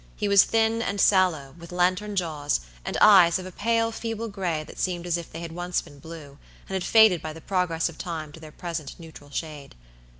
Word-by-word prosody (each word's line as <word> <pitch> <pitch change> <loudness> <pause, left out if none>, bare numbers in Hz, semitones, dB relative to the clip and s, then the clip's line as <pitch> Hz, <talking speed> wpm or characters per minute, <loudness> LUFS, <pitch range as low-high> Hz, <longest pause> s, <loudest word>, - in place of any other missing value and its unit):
He 205 - -2
was 200 -1 +6
thin 225 0 +1
and 205 -3 -2
sallow, 175 -10 +2
with 170 0 -11
lantern 185 +4 0
jaws, 155 - -1 0.2
and - - -3
eyes 185 -5 +7
of 185 - -7
a 185 - -8
pale, 230 +4 0
feeble 225 0 -5
gray, 180 -6 -3
that - - -12
seemed 175 -2 -2
as 175 -1 0
if 170 -1 -6
they 165 - -7
had 165 -1 -6
once 175 +1 -2
been 145 -4 -12
blue, 150 -3 -11 0.3
and - - -8
had 190 -1 -1
faded 220 -6 +5
by 155 -1 -6
the 165 - -11
progress 180 -2 -1
of 170 - -10
time 160 -4 -5
to 160 - -13
their 155 -1 -11
present 165 -3 -6
neutral 160 -3 -13
shade. 150 -1 -7
175 Hz, 220 wpm, -25 LUFS, 160-195 Hz, 0.3 s, eyes